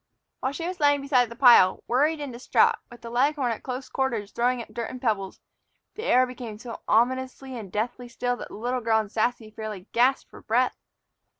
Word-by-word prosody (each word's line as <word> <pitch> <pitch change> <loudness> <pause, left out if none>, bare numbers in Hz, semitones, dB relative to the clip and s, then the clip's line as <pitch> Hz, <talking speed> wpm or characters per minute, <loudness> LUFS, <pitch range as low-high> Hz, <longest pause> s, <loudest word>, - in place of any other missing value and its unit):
While 260 - -1
she 330 +3 -4
was 365 0 -5
lying 290 -1 +4
beside 255 -4 +2
the 235 - -9
pile, 235 -7 +6
worried 300 +5 +2
and 285 -4 -5
distraught, 240 +2 +3
with 240 0 -14
the 230 - -8
leghorn 265 +1 +1
at 225 - -4
close 255 0 -5
quarters 230 -7 -2
throwing 245 +1 +1
up - - -17
dirt 235 -2 -4
and 255 - -7
pebbles, 210 -6 -2 0.5
the 445 - -6
air 255 - +5
became 245 -4 -8
so 230 +1 -8
ominously 260 +3 +1
and 210 -6 -8
deathly 240 +4 -3
still 245 +1 -2
that - - -7
the - - -11
little 245 +4 -2
girl 225 -1 +2
and 210 -2 -4
Sassy 225 -1 -1
fairly 215 -3 -7
gasped 255 +3 +2
for - - -12
breath. 245 +3 +1
245 Hz, 205 wpm, -26 LUFS, 225-260 Hz, 0.5 s, pile